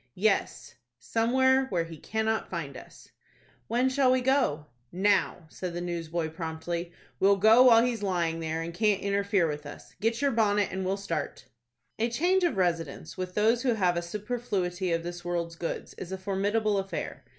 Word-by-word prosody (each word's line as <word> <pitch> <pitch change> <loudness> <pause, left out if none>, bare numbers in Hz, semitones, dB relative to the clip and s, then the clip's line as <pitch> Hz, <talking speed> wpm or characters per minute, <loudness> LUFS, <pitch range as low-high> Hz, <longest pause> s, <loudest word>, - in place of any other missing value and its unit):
"Yes, 215 +4 0 0.2
somewhere 260 +3 +2
where 175 -8 0
he 165 0 -9
cannot 220 +6 -2
find 150 -6 -5
us." - - -13 0.6
"When 245 +3 +2
shall 260 0 +3
we 255 0 +3
go?" 250 - +1 0.3
"Now," 190 -2 +1
said 180 0 -6
the - - -2
newsboy, 170 -2 -3
promptly. 165 +1 -4 0.3
"We'll 200 +1 +5
go 220 +5 +6
while 230 -2 +7
he 250 - +1
is 230 -3 -5
lying 170 -4 0
there, 160 0 -2
and 170 +1 -6
can't 205 +2 +1
interfere 200 -2 +1
with 150 -1 -5
us. 145 - -11
Get 225 +2 +1
your 280 0 +2
bonnet, 210 -3 +2
and 190 +1 -3
we'll 190 +1 -1
start." 200 -8 -4 0.5
A 230 +2 +1
change 360 +10 +2
of 340 - +1
residence 165 -4 -1
with 185 -1 -5
those 225 +3 +3
who 250 -3 +1
have 180 -4 +2
a 170 - 0
superfluity 190 -2 -3
of 165 0 0
this 175 0 -6
world's 170 -1 -3
goods 165 0 -5
is 185 - -7
a 190 - -3
formidable 200 +2 0
affair. 195 0 -5
195 Hz, 180 wpm, -28 LUFS, 170-225 Hz, 0.6 s, while